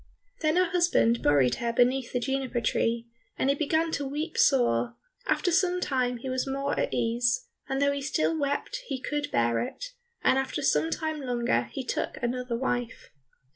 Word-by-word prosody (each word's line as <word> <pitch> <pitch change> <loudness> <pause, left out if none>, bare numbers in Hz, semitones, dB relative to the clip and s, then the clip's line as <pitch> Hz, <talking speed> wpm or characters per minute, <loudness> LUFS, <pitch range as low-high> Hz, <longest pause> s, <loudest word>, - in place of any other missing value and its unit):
Then 310 0 +2
her 365 -1 +2
husband 340 -10 +3
buried 135 -4 +3
her 235 0 -1
beneath 245 +2 +2
the 245 - 0
juniper 265 -1 -1
tree, 230 +1 0 0.3
and 270 - +2
he - - +1
began 320 +2 +1
to 285 - -1
weep 300 +4 -4
sore; 120 - +3 0.3
after 355 - +1
some 360 +1 +2
time 255 -6 0
he 240 - -7
was 255 +1 -1
more 275 +1 -1
at - - 0
ease, 235 0 +1 0.2
and 270 0 0
though 280 0 +3
he 280 0 -3
still 295 +4 0
wept 285 - -1
he 260 - -3
could 290 +2 -3
bear 115 - +1
it, - - -5 0.3
and 265 - +4
after 270 +2 -3
some 320 +3 +2
time 315 -2 -3
longer 245 -2 0
he 270 - -4
took - - -2
another 245 0 -2
wife. 245 -2 -3
265 Hz, 180 wpm, -28 LUFS, 240-295 Hz, 0.3 s, and